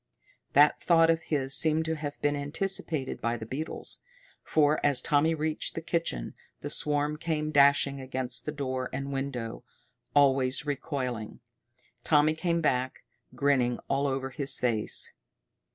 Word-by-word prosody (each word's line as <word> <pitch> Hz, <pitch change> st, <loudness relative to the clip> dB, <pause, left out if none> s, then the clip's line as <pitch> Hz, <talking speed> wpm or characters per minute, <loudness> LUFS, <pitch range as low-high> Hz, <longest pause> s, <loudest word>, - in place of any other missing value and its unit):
That 145 Hz, +2 st, +5 dB
thought 165 Hz, -1 st, +5 dB
of 165 Hz, 0 st, 0 dB
his 135 Hz, -3 st, -1 dB
seemed 160 Hz, +1 st, +3 dB
to 160 Hz, -, -1 dB
have 150 Hz, -2 st, -5 dB
been 145 Hz, 0 st, +1 dB
anticipated 145 Hz, -1 st, -2 dB
by 115 Hz, +1 st, -1 dB
the 110 Hz, -, -7 dB
beetles, 145 Hz, +7 st, -5 dB, 0.4 s
for 150 Hz, -1 st, +2 dB
as 145 Hz, -3 st, +3 dB
Tommy 160 Hz, +1 st, +2 dB
reached 155 Hz, 0 st, -2 dB
the 165 Hz, -, -3 dB
kitchen 165 Hz, -, -2 dB, 0.3 s
the -, -, -5 dB
swarm 150 Hz, 0 st, 0 dB
came 155 Hz, -1 st, -2 dB
dashing 140 Hz, -1 st, +4 dB
against 130 Hz, -1 st, -2 dB
door 130 Hz, -3 st, -3 dB
and 140 Hz, +1 st, -4 dB
window, 125 Hz, -4 st, -4 dB, 0.5 s
always 135 Hz, -1 st, +3 dB
recoiling. 130 Hz, -6 st, -4 dB, 0.6 s
Tommy 150 Hz, 0 st, +4 dB
came 170 Hz, +1 st, -1 dB
back, 130 Hz, -4 st, -1 dB, 0.3 s
grinning 130 Hz, -4 st, +2 dB
all 140 Hz, +1 st, +1 dB
over 135 Hz, 0 st, -2 dB
his 140 Hz, 0 st, 0 dB
face. 115 Hz, -4 st, 0 dB
140 Hz, 135 wpm, -28 LUFS, 130-155 Hz, 0.6 s, That